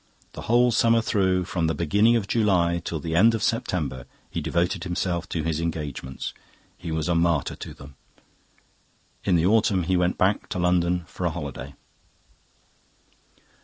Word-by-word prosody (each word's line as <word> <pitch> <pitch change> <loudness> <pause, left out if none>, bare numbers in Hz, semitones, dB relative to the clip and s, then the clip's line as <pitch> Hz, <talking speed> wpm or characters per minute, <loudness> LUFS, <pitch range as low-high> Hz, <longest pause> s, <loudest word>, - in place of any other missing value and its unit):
The - - -8
whole 120 +1 +4
summer 115 0 +4
through, 95 -5 +1
from 85 -2 -1
the 80 - -1
beginning 105 +9 +3
of 110 -4 -1
July 90 -7 +2
till 80 - -3
the 80 +2 -3
end 115 +6 +5
of 110 - -3
September, 70 - -2 0.2
he - - -3
devoted 85 +1 -1
himself 90 -1 -2
to 80 - -2
his 80 0 -1
engagements; 75 -5 -4 0.4
he 85 - -7
was 80 -1 -1
a 85 - +2
martyr 85 -3 +1
to - - -8
them. 70 0 -13 1.3
In 95 - +3
the 85 0 +2
autumn 100 -2 +3
he 95 +3 0
went 90 0 +1
back 95 +2 +1
to - - -4
London 90 0 +1
for 90 +1 -3
a - - +1
holiday. 70 -4 -7
85 Hz, 165 wpm, -25 LUFS, 80-95 Hz, 1.3 s, end